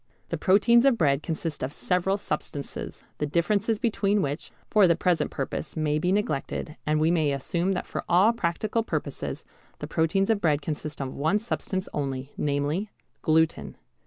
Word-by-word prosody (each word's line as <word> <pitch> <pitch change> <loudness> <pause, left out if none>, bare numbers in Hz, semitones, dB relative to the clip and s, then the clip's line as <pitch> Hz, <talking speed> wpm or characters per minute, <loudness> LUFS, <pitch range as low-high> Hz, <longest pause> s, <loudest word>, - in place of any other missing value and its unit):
The - - -2
proteins 225 +5 +5
of 270 -4 +5
bread 140 -5 +2
consist 160 -1 -4
of 130 - -2
several 180 +5 0
substances, 150 -6 -5 0.2
the 150 - 0
differences 200 +8 +1
between 205 -3 +1
which, 145 +3 -3 0.2
for 210 -3 +5
the 170 - +4
present 175 0 +1
purpose, 140 +2 -4
may 150 -1 +1
be 180 +3 +1
neglected, 160 - -1
and 155 0 +2
we 160 +2 +3
may 155 -4 +2
assume 170 +7 -1
that 180 - -3
for - - -4
all 195 +7 +5
practical 215 +2 -1
purposes 225 - -4 0.3
the - - -5
proteins 195 +6 +1
of 210 -2 +1
bread 150 -3 +3
consist 150 -1 -4
of 130 -1 -4
one 160 +8 +1
substance 200 -3 -3
only, 135 -1 -3
namely 145 +8 -1 0.3
gluten. 160 0 +1
170 Hz, 165 wpm, -26 LUFS, 150-200 Hz, 0.3 s, proteins